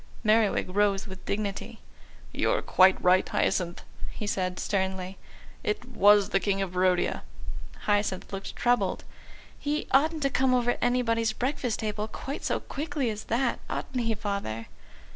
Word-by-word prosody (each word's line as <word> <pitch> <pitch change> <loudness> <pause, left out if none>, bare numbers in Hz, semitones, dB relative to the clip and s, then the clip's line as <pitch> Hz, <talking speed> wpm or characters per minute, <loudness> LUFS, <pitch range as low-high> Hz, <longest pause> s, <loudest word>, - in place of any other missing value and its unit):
Merriwig 215 -4 +2
rose 200 -1 +2
with 190 -3 -10
dignity. 200 -1 -3 0.5
"You're - - +1
quite 185 0 +5
right, 185 +1 +4
Hyacinth," 175 -2 0 0.3
he 210 - -6
said 185 -3 -1
sternly; 190 -1 -2 0.4
"it 210 +3 -2
was 205 -4 +5
the 195 - +2
King 195 0 0
of 195 -2 -2
Barodia." 185 0 +1 0.6
Hyacinth 205 -2 0
looked 195 0 -5
troubled. 240 -6 +1 0.6
"He 295 +1 -1
oughtn't 310 +3 +3
to 275 - +2
come 260 0 +3
over 245 -1 +1
anybody's 230 -2 +1
breakfast 250 -1 -2
table 215 0 -2
quite 270 +6 -6
so - - 0
quickly 290 -4 -2
as 210 0 -7
that. 240 +2 0
Ought - - -2
he, 230 -3 0
Father?" 200 - -3
210 Hz, 145 wpm, -28 LUFS, 190-245 Hz, 0.6 s, quite